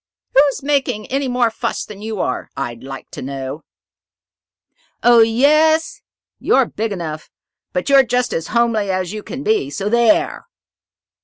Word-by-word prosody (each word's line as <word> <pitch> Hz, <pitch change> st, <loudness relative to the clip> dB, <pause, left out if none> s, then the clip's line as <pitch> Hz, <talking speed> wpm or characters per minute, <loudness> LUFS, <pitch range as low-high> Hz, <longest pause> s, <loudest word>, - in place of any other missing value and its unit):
"Who's 275 Hz, 0 st, +3 dB
making 270 Hz, -6 st, 0 dB
any 275 Hz, 0 st, 0 dB
more 245 Hz, -2 st, +1 dB
fuss -, -, -3 dB
than 205 Hz, -1 st, -11 dB
you 220 Hz, -2 st, -5 dB
are, 125 Hz, -, -3 dB
I'd 120 Hz, 0 st, -5 dB
like 135 Hz, 0 st, -9 dB
to -, -, -8 dB
know?" 135 Hz, +2 st, -5 dB, 1.4 s
"Oh, 240 Hz, -1 st, +6 dB
yes. 305 Hz, +8 st, +3 dB, 0.4 s
You're 265 Hz, -, +3 dB
big 225 Hz, -1 st, -4 dB
enough, 160 Hz, -5 st, -5 dB, 0.4 s
but 180 Hz, -, -2 dB
you're 275 Hz, -1 st, +7 dB
just 250 Hz, 0 st, -1 dB
as 165 Hz, 0 st, -3 dB
homely 230 Hz, -4 st, +1 dB
as 185 Hz, 0 st, -2 dB
you 215 Hz, -, -5 dB
can 255 Hz, +6 st, -7 dB
be. 430 Hz, -7 st, +1 dB
So 205 Hz, -7 st, -3 dB
there!" 235 Hz, -, +2 dB
225 Hz, 150 wpm, -18 LUFS, 185-270 Hz, 1.4 s, you're